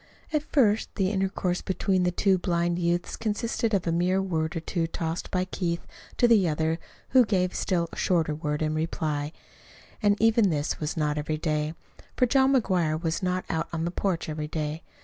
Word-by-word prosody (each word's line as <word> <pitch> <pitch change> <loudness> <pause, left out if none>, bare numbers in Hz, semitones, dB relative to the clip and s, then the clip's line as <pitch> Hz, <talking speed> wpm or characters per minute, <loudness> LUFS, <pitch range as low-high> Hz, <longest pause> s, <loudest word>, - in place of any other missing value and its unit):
At 305 - +2
first 220 -7 +3
the 190 -1 +1
intercourse 190 -2 -1
between 190 0 0
the 180 - +3
two 190 +1 +2
blind 175 -1 0
youths 175 0 0
consisted 230 +1 -1
of 190 - 0
a 170 - +1
mere 180 +3 +2
word 165 -3 -1
or - - 0
two 165 0 -2
tossed 165 0 -3
by 185 0 0
Keith 170 -2 -3 0.3
to 240 - +5
the 210 -7 +5
other 160 +2 0 0.3
who 255 -1 +6
gave 185 -5 +1
a - - -12
still 170 -3 0
shorter 165 -4 +1
word 150 0 -2
in 155 0 0
reply. 155 -2 -2 0.7
And 205 -1 +3
even 225 -2 +4
this 150 -3 -1
was 155 +1 -3
not 150 -1 0
every 155 +1 -2
day, 155 0 -1 0.4
for 250 - +5
John 265 +2 +4
McGuire 175 -10 +1
was 165 +1 -1
not 185 0 -1
out 160 - -1
on 165 -1 -2
the 170 - -1
porch 180 -2 -1
every 155 -1 -3
day. 155 +1 -3
175 Hz, 190 wpm, -27 LUFS, 160-195 Hz, 0.7 s, who